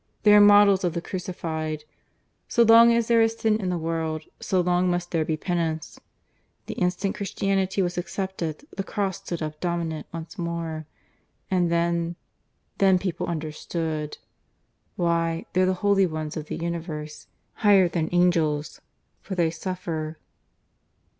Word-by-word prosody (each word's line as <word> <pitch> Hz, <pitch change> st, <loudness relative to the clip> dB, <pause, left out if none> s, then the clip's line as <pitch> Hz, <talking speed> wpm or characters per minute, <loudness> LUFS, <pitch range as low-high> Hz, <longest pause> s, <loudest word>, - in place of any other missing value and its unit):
They 210 Hz, 0 st, +7 dB
are 210 Hz, -, +8 dB
models 205 Hz, -2 st, +6 dB
of 175 Hz, -2 st, 0 dB
the 170 Hz, -, -1 dB
Crucified. 160 Hz, -4 st, -4 dB, 0.6 s
So 235 Hz, -, +4 dB
long 230 Hz, +1 st, +8 dB
as 235 Hz, -1 st, +2 dB
there 230 Hz, -1 st, +4 dB
is 225 Hz, 0 st, +2 dB
Sin 220 Hz, -1 st, +1 dB
in 185 Hz, -, -1 dB
the 180 Hz, -, -1 dB
world, 160 Hz, -1 st, -2 dB, 0.2 s
so 190 Hz, -, 0 dB
long 180 Hz, +1 st, +2 dB
must 175 Hz, 0 st, -2 dB
there 165 Hz, -2 st, +1 dB
be 155 Hz, 0 st, -2 dB
Penance. 165 Hz, -2 st, -2 dB, 0.7 s
The -, -, -5 dB
instant 180 Hz, +2 st, -1 dB
Christianity 195 Hz, -1 st, 0 dB
was 175 Hz, 0 st, -2 dB
accepted, 175 Hz, -, -4 dB
the 195 Hz, -, -2 dB
Cross 195 Hz, -2 st, -2 dB
stood 175 Hz, -4 st, -5 dB
up 155 Hz, 0 st, -5 dB
dominant 170 Hz, -3 st, -2 dB
once 165 Hz, +4 st, -8 dB
more.... 165 Hz, -2 st, -4 dB, 0.6 s
And 180 Hz, -2 st, +2 dB
then... 170 Hz, 0 st, 0 dB, 0.6 s
then 190 Hz, -2 st, +5 dB
people 180 Hz, -2 st, -3 dB
understood. 155 Hz, -1 st, -3 dB, 0.8 s
Why, 165 Hz, -1 st, 0 dB
they're 185 Hz, 0 st, +3 dB
the 185 Hz, -, +1 dB
Holy 195 Hz, -2 st, +4 dB
Ones 155 Hz, -2 st, -5 dB
of 155 Hz, -2 st, -5 dB
the -, -, -4 dB
universe 165 Hz, -3 st, -5 dB, 0.3 s
higher 200 Hz, -3 st, +5 dB
than 165 Hz, -2 st, -2 dB
angels; 165 Hz, -4 st, +1 dB, 0.4 s
for 190 Hz, -, -6 dB
they 170 Hz, -3 st, +2 dB
suffer. 165 Hz, -2 st, -4 dB
175 Hz, 145 wpm, -25 LUFS, 160-190 Hz, 0.8 s, are